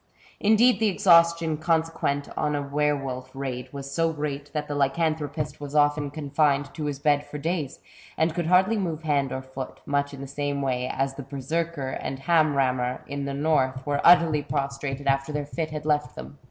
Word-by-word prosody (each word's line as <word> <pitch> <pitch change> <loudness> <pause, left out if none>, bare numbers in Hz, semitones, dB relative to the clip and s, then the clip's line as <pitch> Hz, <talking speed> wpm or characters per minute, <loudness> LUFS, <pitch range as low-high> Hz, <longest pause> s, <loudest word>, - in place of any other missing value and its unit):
Indeed 220 +1 +4
the 220 - +3
exhaustion 170 -5 +4
consequent 160 -3 0
on 150 -1 0
a 145 - -1
were 150 +1 +1
wolf 130 -2 -5
raid 130 -2 -5
was 140 -1 -7
so 165 +1 +2
great 145 -2 -4
that 150 -1 -3
the 145 - -3
lycanthropist 150 +1 -1
was 145 0 -7
often 145 0 +3
confined 145 -1 0
to 155 - -4
his 145 -2 -2
bed 145 0 +2
for 150 - -8
days, 155 -2 -2 0.4
and 160 0 +2
could 170 -1 -2
hardly 190 +5 +4
move 165 -5 -3
hand 140 -4 +1
or 130 - -4
foot, 130 0 -7
much 140 0 0
in 140 - -9
the - - -5
same 140 +1 -3
way 125 -1 -1
as 135 0 -1
the 140 - -7
herserkir 140 +1 -3
and 135 - -4
ham 155 -1 +3
rammir 125 -2 0
in 140 0 -4
the 140 0 -3
North 135 -3 +1
were 145 -1 0
utterly 170 -3 +6
prostrated 140 -1 -3
after 135 +1 +1
their 150 -1 -2
fit 155 +2 -3
had 150 -1 -6
left 150 -4 0
them. 145 - -10
145 Hz, 195 wpm, -25 LUFS, 140-160 Hz, 0.4 s, utterly